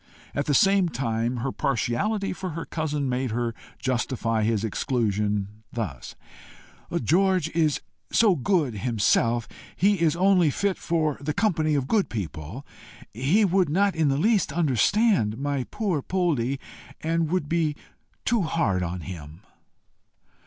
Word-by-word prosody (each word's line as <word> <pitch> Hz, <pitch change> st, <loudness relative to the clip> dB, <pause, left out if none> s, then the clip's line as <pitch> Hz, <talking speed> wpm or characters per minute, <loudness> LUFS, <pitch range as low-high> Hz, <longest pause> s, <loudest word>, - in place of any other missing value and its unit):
At 140 Hz, -, -1 dB
the 145 Hz, -, +2 dB
same 195 Hz, -2 st, +4 dB
time 120 Hz, -3 st, -1 dB
her 135 Hz, -, 0 dB
partiality 140 Hz, -, -1 dB
for 185 Hz, 0 st, -5 dB
her 165 Hz, -, -4 dB
cousin 150 Hz, -3 st, -2 dB
made 130 Hz, 0 st, -1 dB
her 120 Hz, +1 st, -1 dB, 0.2 s
justify 120 Hz, -3 st, -1 dB
his 110 Hz, -1 st, +1 dB
exclusion 105 Hz, -3 st, 0 dB, 0.2 s
thus: 100 Hz, -, -5 dB, 0.9 s
"George 185 Hz, -2 st, +2 dB
is 160 Hz, -3 st, +1 dB, 0.3 s
so 215 Hz, -5 st, +4 dB
good 155 Hz, -, +1 dB
himself, 115 Hz, +1 st, +1 dB, 0.3 s
he 200 Hz, -1 st, +2 dB
is 165 Hz, -2 st, +3 dB
only 180 Hz, -2 st, +4 dB
fit 195 Hz, +6 st, -1 dB
for 155 Hz, -4 st, 0 dB
the 150 Hz, +1 st, -2 dB
company 160 Hz, -8 st, +1 dB
of 135 Hz, -2 st, 0 dB
good 210 Hz, +2 st, +2 dB
people. 95 Hz, -, -6 dB, 0.5 s
He 145 Hz, -, +3 dB
would 185 Hz, -3 st, +2 dB
not 195 Hz, +4 st, +2 dB
in 160 Hz, -2 st, +2 dB
the 135 Hz, -1 st, +2 dB
least 205 Hz, +1 st, +2 dB
understand 155 Hz, -, +2 dB
my 140 Hz, -1 st, -2 dB
poor 195 Hz, -9 st, -1 dB
Poldie, 140 Hz, -8 st, 0 dB, 0.4 s
and 165 Hz, 0 st, 0 dB
would 180 Hz, -3 st, 0 dB
be 160 Hz, -2 st, 0 dB, 0.5 s
too 235 Hz, -2 st, +2 dB
hard 155 Hz, -, 0 dB
upon 90 Hz, 0 st, -3 dB
him." 80 Hz, -1 st, -9 dB
145 Hz, 140 wpm, -25 LUFS, 115-180 Hz, 0.9 s, same